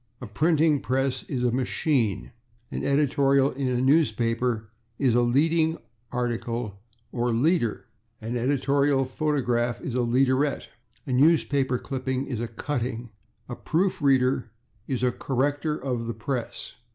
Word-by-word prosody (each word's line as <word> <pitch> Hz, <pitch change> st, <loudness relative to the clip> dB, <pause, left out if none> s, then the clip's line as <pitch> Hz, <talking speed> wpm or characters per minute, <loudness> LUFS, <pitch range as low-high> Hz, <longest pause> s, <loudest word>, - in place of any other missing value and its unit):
A 125 Hz, -, -7 dB
printing 150 Hz, -, +2 dB
press 130 Hz, +3 st, 0 dB
is 130 Hz, -4 st, -2 dB
a 125 Hz, -, +2 dB
/machine/. 125 Hz, -, 0 dB, 0.4 s
An -, -, -4 dB
editorial 140 Hz, -1 st, +3 dB
in 135 Hz, 0 st, -3 dB
a 125 Hz, -1 st, 0 dB
newspaper 120 Hz, -5 st, +1 dB, 0.3 s
is 130 Hz, -4 st, +2 dB
a 120 Hz, -, +4 dB
/leading 160 Hz, +7 st, +2 dB, 0.3 s
article/ 120 Hz, -4 st, -3 dB, 0.3 s
or 120 Hz, 0 st, -1 dB
/leader/. 120 Hz, -, +1 dB, 0.4 s
An 115 Hz, +2 st, -4 dB
editorial 140 Hz, +2 st, +2 dB
paragraph 125 Hz, -4 st, 0 dB
is 130 Hz, -, -5 dB
a 125 Hz, -, 0 dB
/leaderette/. 130 Hz, +4 st, +1 dB, 0.4 s
A -, -, -5 dB
newspaper 140 Hz, -2 st, +3 dB
clipping 130 Hz, +1 st, -3 dB
is 125 Hz, -5 st, -4 dB
a 120 Hz, -, -2 dB
/cutting/. 120 Hz, -1 st, -4 dB, 0.4 s
A 120 Hz, -, -5 dB
proof 180 Hz, +7 st, -1 dB
reader 130 Hz, -3 st, +2 dB, 0.4 s
is 130 Hz, -2 st, -2 dB
a 125 Hz, -, +3 dB
/corrector 145 Hz, +5 st, -1 dB
of 125 Hz, -3 st, -3 dB
the 115 Hz, -, -3 dB
press 120 Hz, +1 st, -5 dB
130 Hz, 135 wpm, -26 LUFS, 120-140 Hz, 0.4 s, a